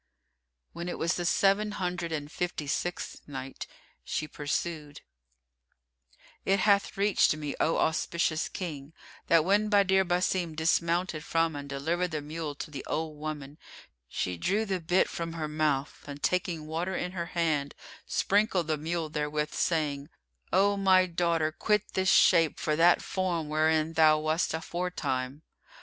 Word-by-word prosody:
When 170 +1 -5
it - - -4
was 170 +2 +1
the 175 - -3
Seven 200 +4 +2
Hundred 180 -3 -3
and 150 -1 -4
Fifty 175 -4 -3
sixth 175 +5 -3
Night, 135 -2 -7 0.4
She 155 - -3
pursued, 150 0 -4 1.4
It 195 0 +2
hath 200 -1 +2
reached 200 -5 +3
me, 150 -2 -4
O 165 - +2
auspicious 160 0 0
King, 155 -5 -6 0.3
that 165 -2 +4
when 205 +3 +3
Badr 195 -2 +4
Basim 175 -2 0
dismounted 170 0 +1
from 165 -1 +1
and 140 0 -7
delivered 165 +6 -1
the 155 -2 -3
mule 150 0 -5
to 150 - -7
the 140 -3 -6
old 155 -2 -3
woman, 150 -1 -6 0.5
she 90 +7 -3
drew 205 - 0
the 190 -3 -1
bit 175 +3 +2
from 165 -1 -5
her 160 -2 -3
mouth 150 -2 -1
and, 145 0 -8
taking 175 -3 0
water 170 +4 -3
in 180 - -2
her 170 -2 -4
hand, 150 -4 0 0.3
sprinkled 200 -3 +2
the 155 -1 0
mule 165 +2 -2
therewith, 150 0 -2
saying, 150 -3 -1 0.4
"O 200 +2 +4
my 190 -1 +5
daughter, 170 -3 0
quit 210 +5 0
this 190 -1 +1
shape 165 -3 +5
for 155 - 0
that 170 +2 +5
form 175 -5 -2
wherein 155 +1 +2
thou 155 -1 +5
wast 155 +2 0
aforetime!" 155 -5 -3
165 Hz, 150 wpm, -29 LUFS, 150-180 Hz, 1.4 s, my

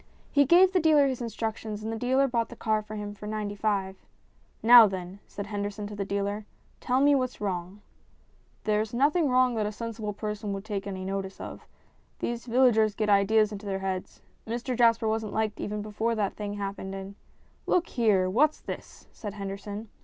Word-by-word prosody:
He 285 -1 +5
gave 365 +6 +6
the 370 - +4
dealer 310 -3 +5
his 260 -2 -3
instructions 220 -2 -4
and 220 +1 -3
the 225 - -4
dealer 260 +3 +2
bought 235 -3 -1
the 240 - -9
car 220 -2 0
for 215 0 -9
him 205 -1 -5
for 210 +1 -9
95. 205 -2 -2 0.7
"Now 235 -1 +10
then," 190 0 -6
said 200 - -6
Henderson 205 0 -4
to 205 0 -7
the 205 - -2
dealer, 200 +1 -2 0.2
" - - -35
tell 255 +1 +1
me 290 +1 +5
what's 255 -2 0
wrong." 190 0 -4 0.4
" - - -36
There 215 0 +2
is 220 +1 -4
nothing 295 +4 +3
wrong 255 0 +4
that 215 -2 0
a - - -3
sensible 220 -1 -5
person 210 0 -4
would 195 +1 -6
take 205 -2 -4
any 190 -1 -5
notice 195 0 -4
of. - - -8 0.5
These 235 +1 -4
villagers 225 -4 +4
get 215 -1 -1
ideas 210 +2 +4
into 205 0 -7
their 195 -1 -1
heads. 190 -1 -5 0.2
Mr 240 +3 -2
Jasper 230 -1 +4
wasn't 220 -1 -1
liked 215 -1 -1
even 210 0 -3
before 220 +2 -1
that 205 -3 -1
thing 205 -1 -4
happened, 195 -1 -5
and 195 +1 -7 0.3
" - - -35
"Look 350 -1 +3
here! 210 -7 +2
What's 290 +11 +2
this?" - - -8
said 205 -2 -7
Henderson. 200 +2 -6
215 Hz, 200 wpm, -28 LUFS, 200-235 Hz, 0.7 s, Now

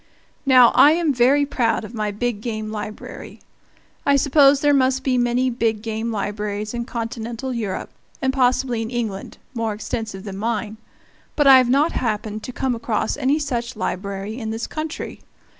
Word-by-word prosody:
Now, 255 -3 +7
I 295 - +7
am 325 -3 +1
very 265 +4 +4
proud 230 -5 0
of 215 - -11
my 215 -2 -2
big 210 +1 -2
game 215 -2 -4
library. 210 0 -7 0.6
I 280 - +3
suppose 280 0 +5
there 290 -1 +4
must 265 -1 +2
be 260 -1 +1
many 245 +1 +1
big 225 -3 -1
game 225 +1 -3
libraries 210 0 -3
in 235 0 -3
Continental 235 +1 -4
Europe, 215 -5 -4 0.3
and 265 -1 0
possibly 250 -2 +1
in 225 - -4
England, 225 -5 -4 0.2
more 225 -3 -2
extensive 215 -2 -5
than 195 -2 -7
mine, 220 0 -2 0.6
but 295 - +2
I 270 -1 +9
have 250 -1 +1
not 285 +6 +3
happened 215 -2 -2
to - - -6
come 260 0 -1
across 230 -2 -1
any 285 +1 +1
such 255 -4 -3
library 200 +2 -4
in 220 -2 -4
this 225 +1 -3
country. 310 0 -6
235 Hz, 170 wpm, -21 LUFS, 215-260 Hz, 0.6 s, I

